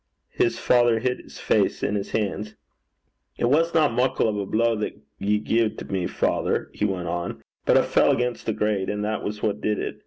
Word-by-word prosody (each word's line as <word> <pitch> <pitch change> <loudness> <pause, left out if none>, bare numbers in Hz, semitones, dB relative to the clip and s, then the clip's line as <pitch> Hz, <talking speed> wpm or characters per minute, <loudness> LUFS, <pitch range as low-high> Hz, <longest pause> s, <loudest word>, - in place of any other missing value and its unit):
His 115 0 +1
father 120 -2 +3
hid 125 +2 -1
his - - -13
face - - +1
in 105 - 0
his 100 -1 -2
hands. 105 0 -2 0.8
'It - - 0
wasna 155 +4 +3
muckle 125 0 +1
o' 105 -1 -2
a 100 - -5
blow 115 +2 +2
that 105 - -3 0.2
ye 105 +1 +1
gied 110 0 -1
me, 95 -2 0
father,' - - -1
he 105 - -1
went 90 -4 -2
on, 85 +1 -4 0.2
'but - - +6
I - - +5
fell - - +3
against 125 -1 0
the 110 - +1
grate, 105 -2 0
and 105 0 -2
that 110 0 -2
was 105 0 -5
what 105 -1 0
did 105 0 0
it. - - -4
110 Hz, 205 wpm, -24 LUFS, 105-120 Hz, 0.8 s, but